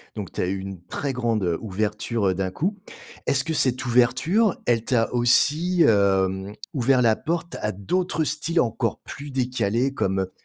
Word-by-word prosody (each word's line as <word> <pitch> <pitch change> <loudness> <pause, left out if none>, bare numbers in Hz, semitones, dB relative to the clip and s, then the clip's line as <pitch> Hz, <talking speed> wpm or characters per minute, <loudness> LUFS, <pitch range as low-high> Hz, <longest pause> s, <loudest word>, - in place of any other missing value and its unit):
Donc 100 -5 -5
tu - - -2
as 90 - 0
eu 95 - -1
une 95 -2 -7
très 140 +6 -3
grande, 115 -4 0
heu, 85 -2 0
ouverture, 105 +1 -1
heu, 95 - +2
d'un 95 0 -2
coup. 190 - -2 0.5
Est-ce 135 -1 +2
que 165 - -2
cette 130 -4 +1
ouverture, 130 - +3
elle 115 -2 +2
t'a 115 -2 +1
aussi, 155 +9 +3
hem, 95 -1 +2 0.2
ouvert 130 -1 +3
la 115 -2 +4
porte 170 +4 -3
à 105 - -1
d'autres 165 - -1
styles 155 +3 0
encore 115 - -1
plus 145 0 -8
décalés 125 -1 0
comme 95 -7 0
heu, 95 0 -4
120 Hz, 180 wpm, -24 LUFS, 100-145 Hz, 0.5 s, la